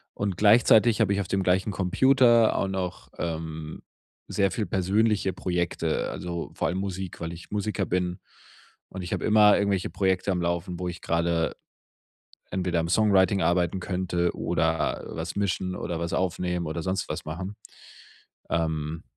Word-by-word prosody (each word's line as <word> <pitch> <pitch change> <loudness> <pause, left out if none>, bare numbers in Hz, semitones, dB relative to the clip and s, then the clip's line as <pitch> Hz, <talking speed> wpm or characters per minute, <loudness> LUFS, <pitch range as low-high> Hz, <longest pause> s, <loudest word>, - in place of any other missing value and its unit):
Und 100 -2 -2
gleichzeitig 110 +1 +5
habe 100 -2 +3
ich 100 - 0
auf 95 - -5
dem 95 0 0
gleichen 95 +3 +2
Computer 120 +4 +4
auch - - 0
noch, 95 -2 -4
ähm, 80 -2 -5 0.4
sehr 100 -1 +1
viel 105 +3 -2
persönliche 100 +1 +1
Projekte, 85 -3 -1
also 85 -1 -5
vor - - 0
allem 90 - -2
Musik, 95 -2 -4
weil 85 0 -4
ich 85 0 -12
Musiker 105 -1 -1
bin 90 0 -1 0.7
und 95 - -7
ich 90 - -7
habe - - -2
immer 105 -1 +6
irgendwelche 100 -2 0
Projekte 95 0 0
am 90 - 0
Laufen, 85 +1 -2
wo 90 - -3
ich 90 -1 -6
gerade 85 0 0 1.0
entweder 90 -2 0
am 80 - -1
Songwriting 95 0 +3
arbeiten 85 +1 +1
könnte 90 -2 -1
oder 80 0 0
was 80 +1 -5
mischen 95 -2 -1
oder 85 -1 -4
was 85 +1 -3
aufnehmen 90 -2 -1
oder 80 +1 -4
sonst 95 +1 -2
was - - -4
machen. 90 +6 -5 0.9
Ähm, 80 -1 -2
90 Hz, 155 wpm, -26 LUFS, 85-100 Hz, 1.0 s, immer